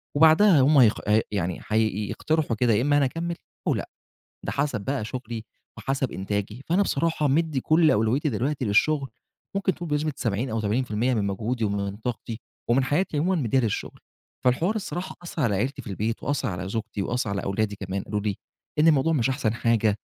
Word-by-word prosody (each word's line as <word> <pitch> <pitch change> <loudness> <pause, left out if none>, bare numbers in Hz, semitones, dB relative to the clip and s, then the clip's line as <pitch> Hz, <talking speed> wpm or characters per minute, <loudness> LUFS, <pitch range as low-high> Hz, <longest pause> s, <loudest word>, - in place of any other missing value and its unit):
وبعدها 160 +1 +6
هم 145 +2 +5
هيخ 115 -5 +5
ي 110 +1 +5
يعني 90 -3 -2
هيقترحوا 110 - 0
كده 115 0 +2
يا 105 - +3
إما 145 +2 +3
أنا 140 - +4
أكمل، 170 +5 -3 0.3
أو - - +4
لأ، - - -4 0.6
ده - - -1
حسب 130 -8 -1
بقى 130 +1 -2
شغلي 115 -1 -5 0.3
وحسب 135 +3 -1
إنتاجي، 105 +5 -3
فأنا 185 +5 +3
بصراحة 155 -3 +1
مدي 150 -1 +1
كل 155 +2 +4
أولويتي 115 +8 +2
دلوقتي 130 +3 -1
للشغل 135 +6 +2 0.5
ممكن 195 -1 +1
تقول 175 -2 -6
بنسبة 150 +1 0
70 115 +4 -1
أو 110 0 -1
80% 120 +2 0
من 105 -3 0
مجهودي، 110 +4 -2
ومن 100 -1 -2
طاقتي 115 0 -5 0.3
ومن 130 +2 +4
حياتي 155 +3 0
عمومًا 175 -1 +1
مديها 125 +3 +2
للشغل. 115 -4 -3 0.4
فالحوار 165 - +2
الصراحة 190 -3 -4
أثر 170 -3 -4
على 105 -5 +2
عيلتي 130 +7 -2
في 105 - -8
البيت، 110 +4 -2
وأثر 140 -3 -1
على 95 0 -4
زوجتي 110 -1 -3
وأثر 120 -1 -1
على 100 - -2
أولادي 100 +1 -1
كمان 95 0 -4
قالوا 105 0 -2
لي: 100 -2 -2 0.4
"إن 160 +2 +6
الموضوع 160 +1 +4
مش 130 -4 +2
أحسن 115 -5 0
حاجة، 115 -2 +2
125 Hz, 185 wpm, -25 LUFS, 105-150 Hz, 0.6 s, وبعدها